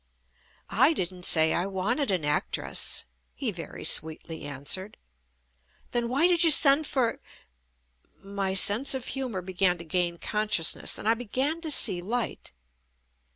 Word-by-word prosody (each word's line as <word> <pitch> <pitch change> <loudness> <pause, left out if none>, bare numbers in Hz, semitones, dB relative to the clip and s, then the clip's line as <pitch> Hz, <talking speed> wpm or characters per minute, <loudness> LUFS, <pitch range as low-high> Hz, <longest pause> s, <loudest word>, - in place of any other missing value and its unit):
"I 260 +9 +4
didn't 180 - -4
say 160 -1 +4
I 175 +3 -1
wanted 205 +9 -2
an 180 -6 -1
actress," 150 0 0 0.3
he - - -2
very - - -9
sweetly 160 +1 0
answered. 145 +8 -3 0.9
"Then 240 -1 -2
why 275 +7 +1
did 350 -1 +3
you 330 - +5
send 290 0 +5
for 245 -4 -1 0.6
." - - -42
My 195 -1 -3
sense 220 +8 +4
of 260 -2 -6
humor 250 -9 -4
began 180 0 0
to 170 - -9
gain 170 +1 -2
consciousness 210 -4 +1
and - - -6
I 225 - +4
began 260 +8 -3
to 325 - -5
see 180 -11 +2
light. 230 +5 -4
200 Hz, 145 wpm, -26 LUFS, 175-255 Hz, 0.9 s, you